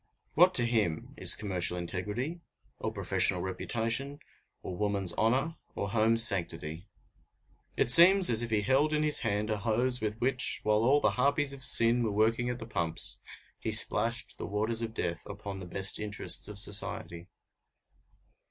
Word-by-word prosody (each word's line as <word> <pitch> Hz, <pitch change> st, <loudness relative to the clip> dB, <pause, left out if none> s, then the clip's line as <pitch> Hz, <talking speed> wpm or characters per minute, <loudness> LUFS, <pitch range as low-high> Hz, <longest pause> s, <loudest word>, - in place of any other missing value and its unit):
What 180 Hz, +3 st, +3 dB
to 120 Hz, -, +5 dB
him 110 Hz, -9 st, -2 dB
is -, -, +5 dB
commercial 90 Hz, -3 st, 0 dB
integrity, 105 Hz, -, -5 dB, 0.4 s
or -, -, -4 dB
professional 90 Hz, -, -1 dB
reputation, 115 Hz, +8 st, -4 dB, 0.5 s
or 90 Hz, -, -7 dB
woman's 100 Hz, -2 st, +1 dB
honor, 135 Hz, +9 st, -1 dB, 0.2 s
or 100 Hz, -, -5 dB
home's 115 Hz, +1 st, +2 dB
sanctity? 85 Hz, -2 st, -5 dB, 0.9 s
It 120 Hz, -, +4 dB
seems 185 Hz, +5 st, +8 dB
as 115 Hz, -1 st, +3 dB
if 120 Hz, -, -4 dB
he 105 Hz, -2 st, 0 dB
held 140 Hz, +7 st, +1 dB
in 150 Hz, 0 st, 0 dB
his 150 Hz, -1 st, +4 dB
hand 105 Hz, -2 st, -3 dB
a 105 Hz, -, -3 dB
hose 120 Hz, +3 st, 0 dB
with 110 Hz, +1 st, -4 dB
which, 130 Hz, +1 st, +1 dB
while 105 Hz, 0 st, +1 dB
all 140 Hz, +4 st, +2 dB
the -, -, +1 dB
harpies 140 Hz, +1 st, 0 dB
of 135 Hz, -1 st, -8 dB
sin 120 Hz, -1 st, +5 dB
were 110 Hz, -2 st, -2 dB
working 115 Hz, +4 st, 0 dB
at 125 Hz, -, -4 dB
the 115 Hz, -, -9 dB
pumps, 85 Hz, -7 st, -1 dB, 0.4 s
he -, -, -4 dB
splashed 115 Hz, +1 st, 0 dB
the -, -, -6 dB
waters 110 Hz, +3 st, -1 dB
of 115 Hz, -1 st, -6 dB
death 85 Hz, -4 st, -4 dB
upon 100 Hz, -1 st, -8 dB
the 90 Hz, -, -10 dB
best 95 Hz, +2 st, +1 dB
interests 105 Hz, -1 st, -3 dB
of 105 Hz, -1 st, -9 dB
society. 100 Hz, -4 st, -4 dB
110 Hz, 165 wpm, -28 LUFS, 100-125 Hz, 0.9 s, seems